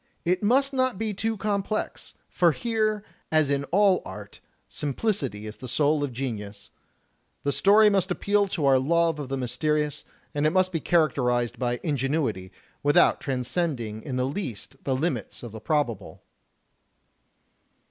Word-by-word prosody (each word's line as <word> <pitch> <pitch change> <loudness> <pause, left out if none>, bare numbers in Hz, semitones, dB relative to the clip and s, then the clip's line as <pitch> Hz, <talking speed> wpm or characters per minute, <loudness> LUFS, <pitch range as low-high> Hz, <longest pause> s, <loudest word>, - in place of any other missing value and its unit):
It 180 +2 +1
must 270 +6 +2
not 255 -5 +1
be 220 0 -2
too 220 +3 -2
complex; 210 0 -2
for 170 -3 +3
here, 215 -2 -1 0.3
as 155 -3 +3
in 140 0 0
all 195 +3 +3
art, 100 +1 -9 0.3
simplicity 140 - -2
is 105 0 -8
the 130 - -8
soul 145 +3 +2
of 140 - -2
genius. 110 -5 -6 0.7
The 140 - +1
story 210 +7 +5
must 195 -2 +2
appeal 205 +3 +1
to 170 -6 -2
our 135 -1 +5
love 165 +3 +2
of 140 -3 -5
the 135 - -2
mysterious, 150 +3 -1 0.3
and 145 +1 +1
it - - +2
must 185 +1 +2
be 165 - -1
characterized 125 -8 +1
by 120 -1 -1
ingenuity, 135 - -1 0.3
with 145 0 +2
out - - +5
transcending 125 -4 -2
in 130 0 -5
the 125 0 +1
least 135 - -6
the 135 - +1
limits 130 - -2
of 120 - -7
the 110 0 -9
probable." 120 - -2
150 Hz, 155 wpm, -26 LUFS, 125-185 Hz, 0.7 s, story